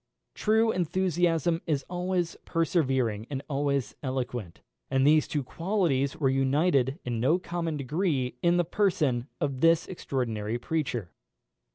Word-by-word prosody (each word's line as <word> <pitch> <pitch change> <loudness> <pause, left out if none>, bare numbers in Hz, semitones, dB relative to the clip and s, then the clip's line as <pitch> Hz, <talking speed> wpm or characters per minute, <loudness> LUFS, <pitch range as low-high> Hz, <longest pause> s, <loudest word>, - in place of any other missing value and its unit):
True 220 +1 +2
enthusiasm 175 -2 +1
is 145 -4 0
always 180 -1 -1
persevering 130 - 0
and 140 -1 -4
always 140 -5 -1
eloquent, 125 - -4 0.3
and 135 0 +2
these 155 +1 +5
two 145 -2 -2
qualities 165 -3 0
were 140 - +2
united 135 +1 +2
in 120 -2 -2
no 140 +9 +3
common 170 -3 -3
degree 140 -3 -1
in 175 0 +3
the 175 - +3
person 155 - +1
of 140 -4 -2
this 165 0 +4
extraordinary 115 - -2
preacher. 120 - -2
145 Hz, 130 wpm, -28 LUFS, 130-170 Hz, 0.3 s, these